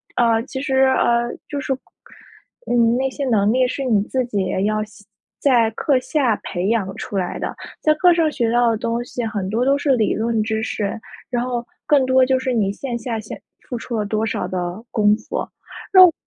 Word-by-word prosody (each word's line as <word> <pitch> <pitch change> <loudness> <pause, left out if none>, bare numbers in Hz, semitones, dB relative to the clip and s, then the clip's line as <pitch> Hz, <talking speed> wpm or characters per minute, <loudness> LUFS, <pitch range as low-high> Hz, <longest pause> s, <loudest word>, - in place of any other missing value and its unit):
呃 230 -2 +3
其 265 0 -6
实， 270 -1 -1
呃 240 -2 +2 0.2
就 285 - -3
是， 270 -1 -1 0.9
你 245 - 0 0.2
那 265 +1 0
些 280 +2 -4
能 215 -4 +2
力 255 +1 +3
是 275 - -3
你 220 -6 +2
自 255 +3 -1
己 200 -5 -1 0.2
要 215 0 +1 0.6
在 235 -5 +3
课 265 +4 +1
下 255 -4 +1
培 180 +2 -2
养 200 -4 0
出 200 - -4
来 180 -2 -2
的， - - -4 0.3
在 305 - +4
课 355 +2 +5
上 325 -3 +2
学 235 -5 0
到 240 0 +3
的 225 - -1
东 235 +1 -2
西 245 -1 -4
很 205 -4 -3
多 230 +5 0
都 275 - +4
是 285 -2 +2
理 215 -3 +2
论 225 0 0
知 220 0 -1
识， 215 0 -3 0.3
然 240 0 0
后 245 -1 -3 0.2
更 285 -3 +4
多 260 0 +4
就 260 0 +2
是 260 0 -1
你 205 -4 +1
线 240 +3 -5
下 230 -1 -3
先 215 - -9 0.3
付 250 - -4
出 235 0 -4
了 210 - -1
多 215 +1 -1
少 - - -2
的 180 +3 -4
功 210 -1 +4
夫， - - -5 0.5
那 370 -1 +10
我 345 - +3
235 Hz, 220 characters per minute, -20 LUFS, 215-260 Hz, 0.9 s, 那